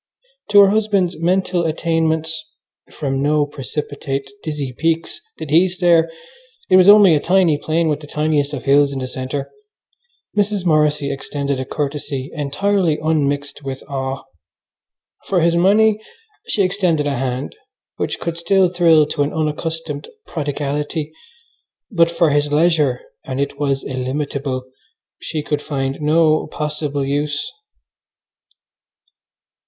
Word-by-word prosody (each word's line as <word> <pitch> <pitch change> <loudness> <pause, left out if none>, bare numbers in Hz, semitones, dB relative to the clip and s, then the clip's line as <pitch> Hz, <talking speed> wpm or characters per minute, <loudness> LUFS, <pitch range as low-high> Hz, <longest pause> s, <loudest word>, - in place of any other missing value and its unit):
To 205 -1 +8
her 195 -1 +6
husband's 200 -5 +1
mental 180 +1 +1
attainments 160 0 -1 0.5
(from 135 -2 -2
no 150 +1 +2
precipitate, 140 0 -4
dizzy 145 -4 -4
peaks 165 - -1 0.2
did 150 - -7
he 170 +4 +5
stare; 175 -2 +3 0.6
it - - +8
was 185 +1 +7
only 205 -4 +8
a 150 - +3
tiny 180 -1 +3
plain 160 +3 0
with 150 -2 0
the 150 - -11
tiniest 150 -1 0
of 145 -4 -5
hills 140 0 +4
in 140 - -4
the 130 -1 -3
centre) 130 +2 -5 0.8
Mrs. 205 -2 0
Morrissy 150 -3 +2
extended 140 0 -3
a 130 - -3
courtesy 140 -1 -4
entirely 160 +3 0
unmixed 145 -2 -1
with 135 -1 -6
awe. 135 -1 -4 1.0
For 185 -3 +2
his 170 +1 +3
money 210 +4 +4 0.5
she 205 - +2
extended 180 -5 +1
a 145 -1 0
hand 130 +1 -3 0.4
which - - -3
could 170 0 -4
still 185 +2 +3
thrill 165 -3 +4
to 145 0 -3
an 145 +1 +1
unaccustomed 160 -1 -3 0.2
prodigality, 150 0 -3 0.8
but 170 -4 +4
for 170 -2 +2
his 145 0 +1
leisure 150 -5 +2 0.2
(and 130 0 -5
it 140 0 -2
was 140 -2 0
illimitable) 130 0 -3 0.6
she 155 -2 -4
could 145 -1 -2
find 135 -1 -3
no 155 +1 +3
possible 150 -2 -3
use. 145 +1 -2
150 Hz, 130 wpm, -19 LUFS, 140-170 Hz, 1.0 s, To